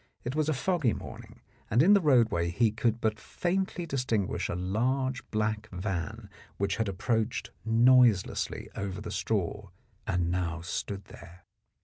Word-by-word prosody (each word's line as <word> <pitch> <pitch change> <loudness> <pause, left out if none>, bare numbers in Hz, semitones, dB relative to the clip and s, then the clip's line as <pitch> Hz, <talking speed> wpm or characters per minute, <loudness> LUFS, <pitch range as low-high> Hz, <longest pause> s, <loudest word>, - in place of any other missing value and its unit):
It 125 +3 -3
was 155 0 +1
a - - +3
foggy 150 - +1
morning, - - -9 0.3
and 120 +6 +4
in 195 +5 +7
the 200 - +5
roadway 115 - +3
he 110 +5 +2
could 115 0 0
but 110 -1 0
faintly 180 - -2
distinguish 125 - -1
a - - -2
large 125 +8 0
black 110 0 -1
van 90 -3 -4 0.3
which 100 0 0
had 110 -3 0
approached 110 +4 -1
noiselessly 115 -2 +4
over 100 -1 -4
the 105 0 -6
straw 100 0 -2 0.4
and 90 -2 0
now 85 -2 -1
stood 95 +3 -4
there. 90 -2 -14
110 Hz, 145 wpm, -29 LUFS, 95-125 Hz, 0.4 s, in